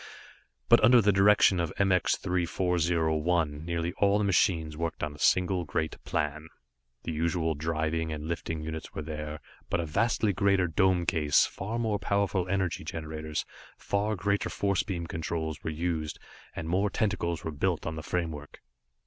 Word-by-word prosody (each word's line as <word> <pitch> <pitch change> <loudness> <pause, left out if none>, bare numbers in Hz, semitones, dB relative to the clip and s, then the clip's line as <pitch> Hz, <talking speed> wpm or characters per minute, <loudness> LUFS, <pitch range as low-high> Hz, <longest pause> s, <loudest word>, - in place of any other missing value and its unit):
But - - +6
under 120 +3 +7
the 105 -2 +4
direction 95 -1 +5
of 85 -2 -1
MX 95 -2 +2
3401, 85 -3 0
nearly 85 0 -2
all 100 0 +4
the 105 - +1
machines 85 -5 +2
worked 85 0 -3
on 75 -1 -2
a 75 - -14
single 90 +1 +2
great 80 +1 -3
plan. 75 +2 -2 0.6
The - - -3
usual 80 +1 0
driving 80 +1 -1
and 75 -1 -5
lifting 80 -1 -3
units 80 0 -6
were 80 - -3
there, 75 0 -6 0.3
but - - 0
a 85 - -1
vastly 105 +5 +1
greater 100 -1 +2
dome 90 +2 +2
case, 75 -4 +3
far 105 +5 -5
more 110 -3 0
powerful 100 -2 0
energy 95 -2 -1
generators, 80 -1 -4 0.3
far 105 +2 -1
greater 100 +2 0
force 100 -2 0
beam 85 -4 -4
controls 80 -1 -4
were - - -2
used 80 -1 -2 0.4
and 80 - -5
more 95 +5 +1
tentacles 95 -5 -1
were 80 - -3
built 85 +3 -1
on 80 - -2
the 80 - -5
framework. 80 -3 -4
85 Hz, 160 wpm, -29 LUFS, 80-95 Hz, 0.6 s, under